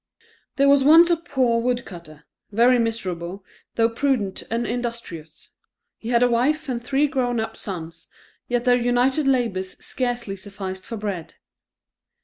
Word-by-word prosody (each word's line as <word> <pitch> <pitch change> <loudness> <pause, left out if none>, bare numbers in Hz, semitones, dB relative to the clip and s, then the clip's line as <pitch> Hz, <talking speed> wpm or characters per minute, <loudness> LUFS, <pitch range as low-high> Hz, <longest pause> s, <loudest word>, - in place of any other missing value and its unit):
There 275 0 +3
was 280 -1 +5
once 330 +4 +7
a - - +5
poor 260 -8 0
woodcutter, 175 -11 -4 0.3
very 240 +4 +4
miserable, 190 -5 -3 0.3
though 225 -1 +4
prudent 230 -5 -1
and 235 +1 -1
industrious; 230 -10 -6 0.5
he 225 - -7
had 240 0 +3
a - - +5
wife 280 +6 +1
and 240 -2 -3
three 275 +3 +2
grown 245 -4 -1
up 220 - -3
sons, 165 -4 -8 0.4
yet 245 0 -1
their 250 -1 +5
united 250 +4 +1
labours 230 -8 0
scarcely 245 -5 -3
sufficed 190 -1 -7
for 230 - -5
bread. 200 -6 -5
235 Hz, 140 wpm, -23 LUFS, 195-255 Hz, 0.5 s, once